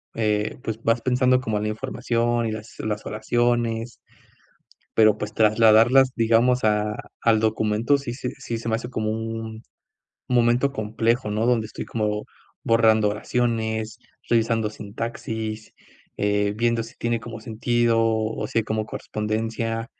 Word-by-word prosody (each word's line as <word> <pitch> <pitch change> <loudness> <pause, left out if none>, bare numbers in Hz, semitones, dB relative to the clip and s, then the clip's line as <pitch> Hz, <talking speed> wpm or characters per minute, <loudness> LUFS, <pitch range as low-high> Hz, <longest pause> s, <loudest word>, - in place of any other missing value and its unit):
eh, 105 -1 0
pues, 110 0 -4
vas 115 +1 +2
pensando 130 0 +3
como 110 -4 -2
la 105 - -2
información 120 0 -1
y - - -2
las 110 +1 -7
las 105 -1 -3
oraciones 120 +1 0 1.0
pero, 110 -1 +6
pues, 105 +1 -5
trasladarlas, 115 +4 +5
digamos, 115 +2 +3
a 105 0 +1 0.3
al 115 -2 +4
documento 110 +4 +1
sí 140 -4 -5
se 125 0 -4
sí 115 - -5
se 115 - -7
me 110 - +2
hace 120 +2 -5
como 110 -3 -2
un 110 0 -5 0.7
un 125 - 0
momento 120 +3 +3
complejo, 115 0 0
¿no?, 110 +2 0
donde 120 -3 +2
estoy - - -6
como 105 -1 -2 0.4
borrando 110 -2 +4
oraciones, 110 0 -1 0.3
revisando 115 -2 +2
sintaxis, 110 +1 -5 0.4
eh, 105 0 +1
viendo 115 0 +1
si 115 - -12
tiene 120 -1 -1
como 115 -1 -8
sentido 115 +1 +1
o 110 -1 0
si - - 0
hay 115 - +1
como 110 0 -2
correspondencia. 115 +2 -3
115 Hz, 145 wpm, -24 LUFS, 110-120 Hz, 1.0 s, pero